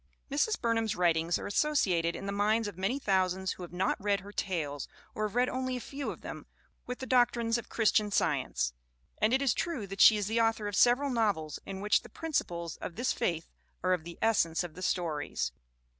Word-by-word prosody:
Mrs. 295 +10 +1
Burnham's 225 -2 0
writings 170 -2 +2
are - - -6
associated 190 - +1
in 195 - -6
the 200 - -2
minds 210 +2 +2
of 205 - -6
many 195 +8 0
thousands 190 -5 +1
who - - -7
have 175 - -7
not 180 +2 0
read 200 -1 +1
her 200 +2 -10
tales, 155 -9 -3 0.3
or 215 0 -1
have 210 - -11
read 250 +1 +3
only 255 0 -2
a - - -4
few 275 +3 -5
of - - -7
them, - - -8 0.4
with 250 0 -4
the 260 - -6
doc 250 -2 +4
trines 235 0 0
of - - -11
Christian 215 -2 +2
Science. 65 - 0 0.5
And 215 - +3
it 265 +2 +3
is 260 -5 +3
true 315 -12 -2
that 195 0 -3
she 220 - +9
is 205 - -1
the 225 +3 +1
author 225 -2 +1
of 205 - -3
several 250 +6 +4
novels 200 - 0
in 195 0 -5
which 210 0 +3
the - - -13
principles 170 - -3
of 170 - -7
this 245 +1 0
faith 165 -2 -2 0.3
are 185 - +3
of 175 -3 -1
the 170 +1 -9
essence 180 -7 +2
of 175 -3 -7
the 185 - -10
stories. 165 -5 -1
205 Hz, 220 wpm, -31 LUFS, 180-235 Hz, 0.5 s, she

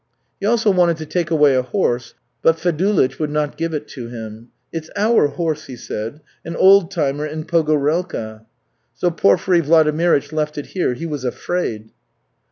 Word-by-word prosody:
He 200 - -1
also 225 -2 +3
wanted 175 -3 +3
to 160 - -6
take 170 0 -2
away 150 -4 +4
a 130 - +3
horse, 125 - -1 0.3
but 165 0 +3
Fedulych 175 -3 +1
would 155 -2 -1
not 150 0 -1
give 165 0 -2
it 150 -1 -4
to 120 -4 -7
him. 110 -1 -9 0.3
'It's 160 -1 -5
our 215 -6 +3
horse,' 155 -1 -3
he 130 - -8
said, 115 +4 -6 0.2
'an 165 +1 -6
old 190 -1 +6
timer 150 -5 -1
in 155 +1 -5
Pogorelka.' 150 -8 0 0.5
So 175 - 0
Porfiry 170 - +3
Vladimirych 155 -1 +3
left 150 -1 -2
it 145 - -4
here. 175 -9 -1
He 165 - -6
was 150 -5 -4
afraid." 120 -5 -3
155 Hz, 170 wpm, -19 LUFS, 140-170 Hz, 0.5 s, old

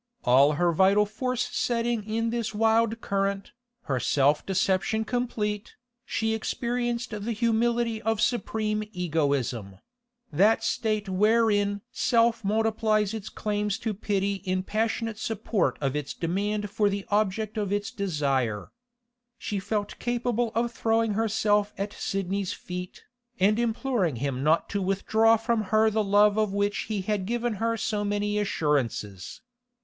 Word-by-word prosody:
All 135 +4 +5
her 175 +3 +2
vital 195 +4 +4
force 250 +4 -2
setting 235 -2 0
in 225 +1 -1
this 230 -2 -2
wild 225 +1 +2
current, 195 0 -1 0.3
her 130 -3 -1
self 145 +3 +2
deception 195 +3 0
complete, 215 -4 -2 0.3
she 220 0 0
experienced 240 +2 -2
the 210 +2 -3
humility 230 0 +1
of 225 -1 0
supreme 215 -2 0
egoism—that 175 - -1
state 215 -3 -1
wherein 205 0 +2
self 230 -1 +2
multiplies 215 0 +1
its 220 -3 -5
claims 210 -1 -2
to 220 - -3
pity 200 -1 -1
in 185 -1 -1
passionate 220 +1 -2
support 225 -5 -1
of 135 -1 -1
its 150 -2 -4
demand 205 +4 -2
for 210 -1 +2
the 200 0 -3
object 210 +1 0
of 210 -3 -1 0.3
desire. 140 - -1 0.7
She 205 -3 -3
felt 205 +1 -3
capable 240 -1 -1
of 235 +1 +1
throwing 225 -1 +1
herself 210 -1 +1
at 200 +1 -3
Sidney's 195 0 -2
feet, 180 0 -7 0.4
and 210 +4 +3
imploring 235 - 0
him 130 +1 -2
not 155 +3 +3
to 200 - -1
withdraw 220 +4 +3
from 225 -1 0
her 220 +2 +3
the 215 0 +1
love 205 +1 +4
of 215 -2 +1
which 200 0 -1
he 210 -3 -2
had 200 -1 -1
given 240 0 -1
her 230 0 +1
so 210 -2 -1
many 205 0 0
assurances. 130 - -2
210 Hz, 135 wpm, -27 LUFS, 195-225 Hz, 0.7 s, All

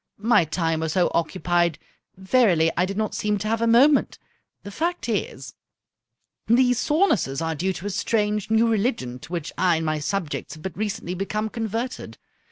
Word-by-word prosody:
My 210 -4 +3
time 165 0 -1
was 160 -1 -2
so 180 -2 +2
occupied, 175 -1 0 0.4
verily 190 -5 +3
I 180 +2 +1
did 195 +1 -5
not 215 -1 -1
seem 210 0 0
to 210 +2 -4
have 225 +1 0
a 230 - +2
moment. 265 +5 +4 0.5
The 200 - -8
fact 345 - -2
is, - - -3 0.9
these 245 +1 +3
sorenesses 255 - +1
are 165 0 -1
due 185 +5 -1
to 185 - -8
a 205 - -2
strange, 210 0 -1
new 220 +1 +3
religion 205 - -1
to 160 - -13
which 170 -3 -4
I 180 -2 +3
and 160 0 -2
my 155 -1 -1
subjects 165 0 -3
have 155 - -14
but 190 - -5
recently 210 -3 -3
become 210 +4 -3
converted. 230 +3 -4
200 Hz, 175 wpm, -24 LUFS, 170-225 Hz, 0.9 s, moment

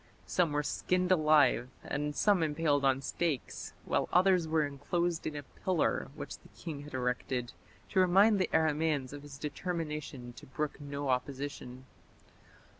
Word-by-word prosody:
Some 175 -4 +1
were 145 0 0
skinned 180 +4 0
alive 150 -7 +4
and 150 0 -2
some 205 -4 +3
impaled 150 -2 +1
on 135 0 +2
stakes, 155 -3 -2
while - - 0
others 180 -2 +4
were 155 -1 +2
enclosed 165 +4 -1
in 155 - -4
a 145 - -5
pillar 180 +4 -1
which - - -7
the - - -19
king 145 +4 -6
had 145 -2 -8
erected 125 -1 -2 0.4
to - - +1
remind 195 +3 +5
the 185 - +1
Aramaeans 155 -4 +1
of 145 - -7
his 145 -1 -10
determination 150 -5 -4
to - - -11
brook 150 +3 -3
no 140 -1 -4
opposition. 130 -1 -3
150 Hz, 150 wpm, -32 LUFS, 140-170 Hz, 0.4 s, remind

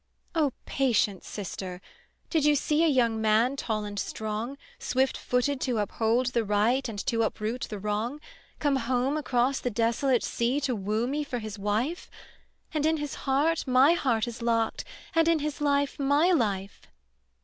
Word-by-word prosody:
"O 310 -5 +2
patience, 230 -7 +1
sister. 185 -2 -6 0.5
Did 320 -4 +2
you 295 0 +5
see 300 +3 +2
A - - +4
young 235 -6 +2
man 220 +5 +3
tall 220 -6 -2
and 205 -1 -5
strong, 220 +6 -4 0.2
Swift 260 +1 +1
footed 255 +2 0
to 250 -4 0
uphold 225 +4 0
the 235 - +2
right 220 +5 +1
And 215 - -6
to 230 -1 +1
uproot 225 +2 -2
the 210 - -5
wrong, 210 +7 -2 0.4
Come 285 -2 +1
home 255 +3 0
across 265 -3 +1
the 245 - -2
desolate 235 +3 +1
sea 240 +4 0
To 265 -3 0
woo 215 +3 -1
me 290 +4 -1
for 265 -4 -4
his 215 -2 -6
wife? 220 - -1 0.6
And 305 -2 0
in 320 0 +2
his 295 -2 -4 0.2
heart 300 +4 +2
my 260 +5 +6
heart 240 -9 +1
is 235 0 -7
locked, 230 -1 0 0.3
And 330 0 +3
in 335 -1 +4
his 300 -1 -4
life 285 0 +1
my 285 +6 +3
life." 200 - 0
250 Hz, 170 wpm, -27 LUFS, 220-285 Hz, 0.6 s, my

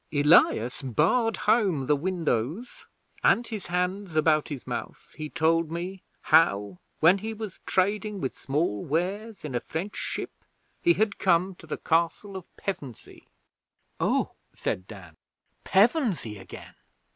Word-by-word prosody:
Elias 145 -5 +4
barred 180 - +2
home 200 - +3
the 150 - +3
windows, 165 - -2 0.4
and, 240 - +4
his 220 -4 -6
hands 180 0 -2
about 155 -1 +3
his 140 -4 -6
mouth, - - -6
he 155 -1 -5
told 165 0 +2
me 180 +3 -5 0.2
how, 100 - +3 0.2
when 175 +5 +6
he 220 +2 -5
was 215 -3 -7
trading 205 +2 0
with 130 - -2
small 135 - -1
wares 195 +7 -2
in 145 - -5
a 120 - +1
French 175 +11 -5
ship, - - -4 0.5
he 345 - +5
had 215 -6 0
come 185 +1 +3
to 160 - -16
the 155 - -3
Castle 170 +4 0
of 185 -2 -7
Pevensey.' 150 - -7 0.7
'Oh!' - - +1 0.2
said 90 +1 -3
Dan. 90 -7 -12 0.5
'Pevensey 195 - +2
again!' 95 - -11
170 Hz, 135 wpm, -27 LUFS, 145-200 Hz, 0.7 s, when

